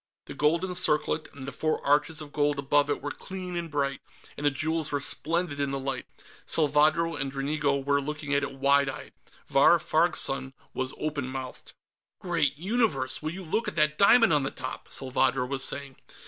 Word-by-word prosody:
The - - -8
golden 165 +6 +1
circlet 155 -3 +2
and 135 -1 -9
the - - -3
four 155 +3 -1
arches 150 +2 +2
of 145 -1 -9
gold 145 -1 +1
above 145 +1 +2
it 145 - -2
were 145 - -2
clean 185 +1 -7
and 170 -1 -3
bright, 140 -2 -1 0.3
and 145 - -7
the 145 - +5
jewels 160 +3 -1
were 145 - 0
splendid 160 +1 -3
in 140 -1 0
the 135 - -2
light. 135 0 -4 0.4
Salvadro 155 +2 +3
and 135 -1 -3
Dranigo 140 +1 0
were 140 0 +2
looking 150 0 -4
at 140 - +3
it 140 -1 -4
wide 140 +1 +3
eyed. 135 - -8 0.3
Vahr - - +5
Farg's - - +1
son 65 0 -2 0.2
was 130 0 -3
open 145 -4 -3
mouthed. 130 -1 -7 0.5
"Great 170 -5 0
Universe! 185 - 0
Will 155 - -2
you 185 +4 -7
look 215 +7 -1
at 210 - -2
that 150 -1 +2
diamond 225 -1 +6
on 150 - +3
the 135 - -1
top!" - - -7
Salvadro 130 -1 0
was 135 0 -1
saying. 140 -1 -3
145 Hz, 190 wpm, -27 LUFS, 140-160 Hz, 0.5 s, diamond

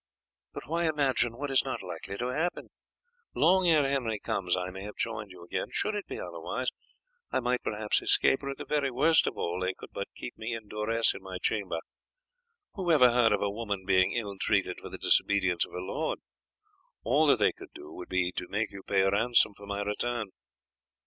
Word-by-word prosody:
"But - - -8
why 170 +3 0
imagine 130 -6 +1
what 145 +1 -3
is 130 - +4
not - - -4
likely 100 - -6
to 125 +3 -2
happen? 170 +5 -2 0.7
Long 180 +3 +4
ere 155 -4 +5
Henry 125 -6 0
comes 95 -3 -1
I 90 0 -3
may 95 +1 -8
have 105 +1 -7
joined 105 -3 -3
you 90 -2 -12
again; 85 - -3
should 215 - 0
it 205 -1 -4
be - - -6
otherwise - - -3 0.6
I - - +2
might 125 0 0
perhaps 105 0 0
escape, 135 - +3
or 140 - -4
at 135 - -4
the - - -6
very 145 -2 +1
worst 150 +6 +4
of - - -3
all 85 +1 -2
they 95 0 -1
could - - -12
but - - -4
keep - - -7
me 115 +1 -3
in 110 -2 -8
duress 110 +2 +1
in - - -9
my 95 -1 -6
chamber. 95 -3 -1 1.0
Who 185 -3 -1
ever 125 -6 +7
heard 120 -2 +4
of 105 - +2
a 100 - 0
woman 100 -3 -3
being 95 -1 +4
ill 100 -5 -3
treated 100 -3 +1
for - - -9
the - - -7
disobedience 95 -4 +2
of - - -19
her - - -4
lord? 95 - -2 0.9
All 145 +6 +3
that 140 - +6
they - - +4
could - - -13
do 75 - -10
would 90 - -9
be 95 -1 +1
to 90 - -3
make 105 +2 -1
you 100 - -9
pay 95 0 +2
ransom 105 +2 +4
for 100 0 -12
my 100 0 -2
return." 110 +1 -2
110 Hz, 210 wpm, -29 LUFS, 95-135 Hz, 1.0 s, ever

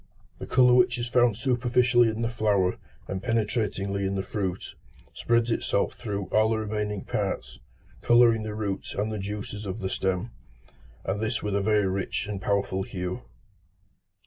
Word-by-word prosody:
The - - -6
colour 125 -1 +5
which 125 -1 +4
is 120 0 -3
found 120 -3 +3
superficially 125 -1 +3
in 110 +1 -3
the - - +1
flower 105 -5 +1 0.3
and 95 -1 -4
penetratingly 105 -4 -1
in 95 0 -1
the 95 - -1
fruit, 95 -3 -4 0.4
spreads 120 0 +1
itself 100 -3 0
through 100 -4 -4
all 110 0 +4
the 110 - +1
remaining 105 -2 -3
parts, - - -3 0.4
colouring 120 -1 +5
the 110 -1 -5
roots 100 -3 -3
and 105 +2 -1
the 105 - -3
juices 105 +1 -5
of 95 - -4
the 95 - -2
stem, 95 +5 -1 0.7
and 100 +2 -2
this 110 +1 -1
with 105 -1 -1
a 100 - +2
very 105 0 +2
rich 95 +1 -2
and 100 -2 -5
powerful 100 -1 0
hue. 90 +3 -4
105 Hz, 165 wpm, -27 LUFS, 100-115 Hz, 0.7 s, colour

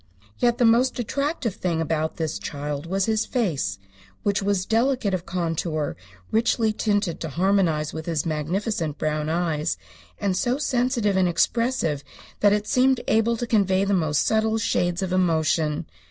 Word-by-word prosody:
Yet 240 -1 +2
the 245 - +3
most 240 +3 +4
attractive 265 - -2
thing 170 -3 -2
about 160 -1 -1
this 160 -1 -2
child 145 +1 -5
was 190 +2 0
his 220 -1 0
face, 170 - -1 0.5
which 205 -1 +1
was 195 -2 0
delicate 230 -2 +1
of 180 -1 -3
contour, 165 -3 -2 0.4
richly 225 0 +2
tinted 205 -5 0
to 160 - -4
harmonize 170 -3 +1
with 160 +1 -6
his 165 -3 -1
magnificent 160 +1 -2
brown 155 0 -1
eyes, 160 - 0 0.4
and 195 -2 0
so 245 +6 +1
sensitive 245 -7 +1
and 185 -1 +3
expressive 175 - +1 0.4
that 205 - +5
it 210 0 +1
seemed 255 +2 +3
able 225 +1 +2
to 240 - -2
convey 195 -4 +2
the 200 - +1
most 155 -6 +1
subtle 220 0 +2
shades 180 -4 0
of 185 -1 -2
emotion. 160 -4 +1
190 Hz, 155 wpm, -24 LUFS, 160-225 Hz, 0.5 s, that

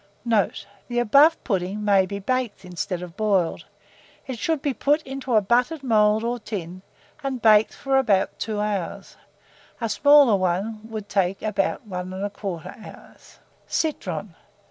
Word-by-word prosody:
Note. 220 -4 +1 0.2
The 240 - -4
above 280 +8 +5
pudding 195 0 -2
may 195 -2 +4
be 200 - -5
baked 235 0 -2
instead 180 +1 -4
of 175 -1 -10
boiled; 195 -6 0 0.6
it 255 -4 -6
should 320 +3 0
be 285 -1 -1
put 295 +4 +1
into 270 -2 -3
a 215 - +5
buttered 250 +8 +1
mould 215 -3 +3
or 240 +1 -2
tin, 185 -5 -6 0.4
and 270 -2 -2
baked 220 -1 +4
for 270 -1 0
about 210 -8 +1
2 215 -2 -3
hours; 205 -4 -3 0.6
a 230 - -1
smaller 285 -1 +5
one 190 +4 -1
would 215 -2 -6
take 195 -2 0
about 210 +2 -1
1 180 -2 -5
1/4 200 +2 -6
hour. - - -14 0.5
CITRON. 315 -2 -2
215 Hz, 145 wpm, -24 LUFS, 195-255 Hz, 0.6 s, above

